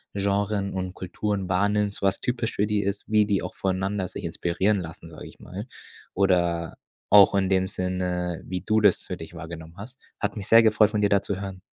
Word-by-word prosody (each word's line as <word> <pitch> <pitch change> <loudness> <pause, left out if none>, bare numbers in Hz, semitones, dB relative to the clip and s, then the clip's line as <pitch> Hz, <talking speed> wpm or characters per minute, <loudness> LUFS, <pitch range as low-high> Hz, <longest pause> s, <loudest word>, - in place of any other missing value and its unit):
Genren 100 0 0
und 95 -1 -4
Kulturen 95 +1 -3
wahrnimmst, 100 +2 +1
was 95 -1 +1
typisch 120 -2 -2
für 105 - +2
die 105 -1 +1
ist, 100 +1 -2
wie 105 -1 +3
die 100 -3 0
auch 90 - -5
voneinander 95 0 -1
sich - - -8
inspirieren 95 +4 0
lassen, 85 0 -10
sage - - -9
ich - - -15
mal. 100 +7 -8 0.5
Oder 85 -3 +1 0.3
auch 100 -1 +8
in 95 -1 +2
dem 95 -1 +2
Sinne, 90 -2 -2
wie 90 0 -4
du 110 0 +1
das 105 -3 +4
für - - -5
dich 80 +1 -10
wahrgenommen 80 0 -9
hast. 125 +7 -10 0.2
Hat 105 +1 -2
mich 100 0 -5
sehr 115 0 +7
gefreut, 110 -1 +4
von 105 - 0
dir 100 - +3
da 100 -1 +3
zu 100 -1 -3
hören. 95 -2 -6
100 Hz, 205 wpm, -25 LUFS, 90-105 Hz, 0.5 s, auch